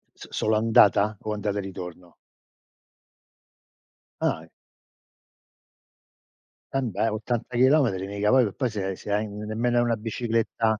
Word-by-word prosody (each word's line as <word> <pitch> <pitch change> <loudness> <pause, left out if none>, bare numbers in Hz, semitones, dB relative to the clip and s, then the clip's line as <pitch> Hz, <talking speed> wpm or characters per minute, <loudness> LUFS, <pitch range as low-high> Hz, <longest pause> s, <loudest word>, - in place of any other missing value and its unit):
S - - -11
solo 110 0 0
andata 105 -1 +4
o 110 - -3
andata 105 -1 -2
e - - 0
ritorno? 90 -3 -9 2.1
Ah. - - 0 2.3
Embè 115 -5 0
80 115 +3 -3
chilometri 125 -8 +3
mica 100 +1 -1
poi 125 -7 +4
poi 125 +4 -1
se 95 -3 -3
se 100 - -7
hai 105 +1 0
nemmeno 110 +4 -2
hai 120 - +4
una 115 -1 +1
bicicletta 115 0 -1
110 Hz, 115 wpm, -25 LUFS, 100-115 Hz, 2.3 s, andata